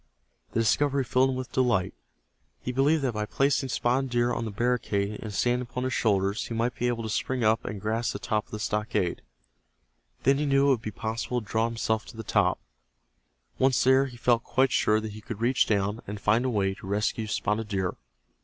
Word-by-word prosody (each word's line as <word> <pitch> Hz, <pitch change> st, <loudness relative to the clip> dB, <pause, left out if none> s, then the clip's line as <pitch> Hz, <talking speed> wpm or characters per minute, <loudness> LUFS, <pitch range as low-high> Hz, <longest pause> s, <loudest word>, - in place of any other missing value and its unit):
The 115 Hz, -, +2 dB
discovery 140 Hz, +4 st, +2 dB
filled 130 Hz, +1 st, +2 dB
him 130 Hz, -, -1 dB
with 130 Hz, -1 st, -5 dB
delight. 120 Hz, -8 st, +1 dB, 0.7 s
He 125 Hz, -, -4 dB
believed 140 Hz, +4 st, +2 dB
that 130 Hz, -3 st, 0 dB
by 105 Hz, 0 st, -2 dB
placing 135 Hz, +1 st, +1 dB
Spotted 130 Hz, +2 st, 0 dB
Deer 120 Hz, 0 st, +1 dB
on 115 Hz, -, -2 dB
the -, -, -3 dB
barricade 105 Hz, -3 st, -1 dB
and 110 Hz, -, -6 dB
standing 120 Hz, +4 st, +1 dB
upon 125 Hz, 0 st, -3 dB
his 130 Hz, -1 st, -1 dB
shoulders 100 Hz, -1 st, +1 dB
he 115 Hz, -, -4 dB
might 120 Hz, +2 st, 0 dB
be 125 Hz, -, -1 dB
able 120 Hz, -1 st, -1 dB
to -, -, -3 dB
spring 125 Hz, +3 st, -1 dB
up 110 Hz, 0 st, +3 dB
and 105 Hz, -, -5 dB
grasp 110 Hz, +3 st, -1 dB
the -, -, -3 dB
top 110 Hz, -3 st, -1 dB
of -, -, -27 dB
the 105 Hz, -, -4 dB
stockade. 105 Hz, -4 st, -1 dB, 1.0 s
Then 135 Hz, +1 st, +4 dB
he 150 Hz, -, 0 dB
knew 135 Hz, 0 st, +4 dB
it -, -, +4 dB
would 130 Hz, -5 st, +2 dB
be 110 Hz, -, -4 dB
possible 115 Hz, +3 st, -3 dB
to 110 Hz, -, -11 dB
draw 110 Hz, +2 st, +1 dB
himself 110 Hz, -1 st, -1 dB
to -, -, -11 dB
the 115 Hz, -, -5 dB
top. -, -, +2 dB, 1.0 s
Once 130 Hz, -1 st, +3 dB
there 130 Hz, +1 st, +4 dB
he 125 Hz, -2 st, -11 dB
felt 120 Hz, -1 st, +2 dB
quite 130 Hz, -1 st, +2 dB
sure 110 Hz, 0 st, +3 dB
that 110 Hz, 0 st, -5 dB
he 110 Hz, +1 st, -10 dB
could 110 Hz, -1 st, -7 dB
reach 125 Hz, +3 st, +2 dB
down, 105 Hz, +1 st, 0 dB
and 105 Hz, +1 st, -5 dB
find 110 Hz, +5 st, +2 dB
a -, -, +1 dB
way 100 Hz, -4 st, +1 dB
to 95 Hz, -, -11 dB
rescue 105 Hz, +2 st, -1 dB
Spotted 105 Hz, +1 st, -1 dB
Deer. 95 Hz, -3 st, -1 dB
115 Hz, 220 wpm, -27 LUFS, 105-125 Hz, 1.0 s, Then